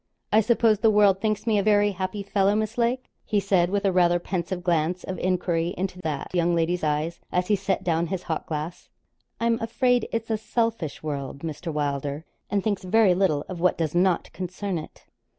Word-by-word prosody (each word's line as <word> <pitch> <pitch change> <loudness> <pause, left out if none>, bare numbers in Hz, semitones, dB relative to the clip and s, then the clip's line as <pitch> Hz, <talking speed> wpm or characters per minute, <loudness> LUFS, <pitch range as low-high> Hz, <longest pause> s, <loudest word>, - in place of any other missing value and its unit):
'I 215 - +6
suppose 225 -1 +3
the 225 +1 +4
world 205 -2 +4
thinks 215 -1 -1
me 220 -3 +3
a - - +3
very 205 0 +3
happy 190 +2 -4
fellow, 200 0 +2
Miss 215 +1 -1
Lake?' 245 +2 -1
he 210 - +1
said, 185 -3 +2
with 200 +1 -1
a 195 - +4
rather 175 -1 +4
pensive 180 0 -3
glance 175 0 0
of 190 - -5
enquiry 175 -2 0
into 180 -1 -3
that 155 -2 -4
young 175 -1 +2
lady's 170 +1 0
eyes, 155 +2 -1
as 180 +1 0
he 210 - +5
set 195 -1 -1
down 170 -1 +1
his 185 +1 -3
hock 160 - -3
glass. 155 +2 -5 0.5
'I'm 230 0 +1
afraid 245 +1 +1
it's 230 0 -2
a 220 - 0
selfish 225 -10 -2
world, 140 -2 -4
Mr. 165 +1 -5
Wylder, 145 0 -2 0.2
and 200 -2 0
thinks 205 -3 0
very 195 0 +4
little 175 -6 +1
of 185 -2 -6
what 180 +1 +2
does 160 -3 -1
not 180 0 +1
concern 185 0 -3
it.' 155 - -12
185 Hz, 200 wpm, -25 LUFS, 170-210 Hz, 0.5 s, I